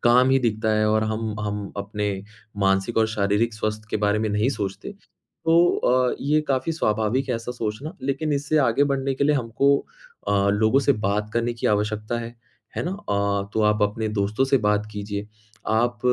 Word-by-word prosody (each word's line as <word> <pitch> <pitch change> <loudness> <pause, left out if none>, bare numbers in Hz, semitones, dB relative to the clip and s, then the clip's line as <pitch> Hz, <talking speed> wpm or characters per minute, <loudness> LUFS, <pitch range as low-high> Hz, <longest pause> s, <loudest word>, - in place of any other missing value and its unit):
काम 125 +2 +5
ही 135 - +5
दिखता 110 -3 0
है 110 0 +2
और 110 0 +2
हम 110 0 -2
हम 105 -1 -4
अपने 105 +1 -3 0.5
मानसिक 95 +3 +1
और 110 - +4
शारीरिक 105 +2 0
स्वास्थ्य 110 0 -3
के - - +1
बारे 105 +1 +2
में 110 0 0
नहीं 105 +5 +1
सोचते। 100 - -4
तो 165 -4 -3 0.2
अ, 125 0 +2
ये 150 +2 +2
काफ़ी 135 +5 0
स्वाभाविक 115 0 0
है - - +1
ऐसा 115 +2 -5
सोचना, 115 +9 -4
लेकिन 145 +3 -1
इससे 145 +2 +1
आगे 140 +1 +3
बढ़ने 135 -1 -1
के 140 - 0
लिए 150 0 +3
हमको 135 +3 +2 0.5
अ, 100 0 +2
लोगों 110 +6 +3
से - - +8 0.2
बात 105 +1 -1
करने 120 0 +1
की 115 - -2
आवश्यकता 105 +2 -1
है, 115 0 -8 0.4
है - - -1
ना? 175 - -2
अ, 100 - -1
तो 110 - +2
आप 105 0 +2
अपने 110 +2 0
दोस्तों 105 +6 +1
से 135 0 +3
बात 105 0 +1
कीजिए 105 0 -5 0.4
आप 115 +1 +1
110 Hz, 190 wpm, -24 LUFS, 105-130 Hz, 0.5 s, से